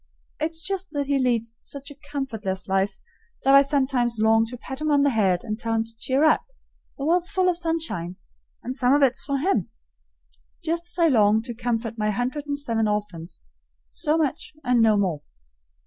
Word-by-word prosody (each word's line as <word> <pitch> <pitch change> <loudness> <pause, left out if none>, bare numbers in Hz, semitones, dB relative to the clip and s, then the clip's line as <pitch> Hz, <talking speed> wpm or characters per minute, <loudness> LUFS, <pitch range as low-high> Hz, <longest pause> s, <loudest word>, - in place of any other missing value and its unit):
It's 325 +2 -3
just 390 0 -2
that 285 -1 -1
he 280 0 +1
leads 230 -2 0
such 280 +1 -7
a 285 - -14
comfortless 220 -9 -3
life 195 0 0 0.5
that 270 - +5
I 275 - +9
sometimes 265 -4 +1
long 220 +1 +4
to 250 +2 -7
pat 265 +3 -8
him 310 - 0
on 285 -1 +4
the 285 - +3
head 190 -6 +2
and 215 -1 -4
tell 225 -1 -1
him 225 - +2
to 225 0 -16
cheer 265 +5 +1
up; 310 - +4 0.5
the 275 - -4
world's 350 +2 +2
full 370 -1 +1
of 360 - +3
sunshine, 325 - -2 0.5
and 255 +2 -4
some 260 0 +4
of 290 - +3
it's 260 -2 +2
for 280 -1 -1
him 270 - 0 0.9
just 335 +2 -1
as 350 - -7
I 335 -1 +5
long 215 -6 +4
to 240 0 -5
comfort 230 -1 -3
my 210 0 +1
hundred 250 +7 -2
and 285 0 -1
seven 230 -6 0
orphans; 185 - -4 0.5
so 310 -1 +1
much 300 -1 -2
and 250 -2 +3
no 220 -2 +5
more. 180 -7 0
250 Hz, 195 wpm, -24 LUFS, 220-290 Hz, 0.9 s, I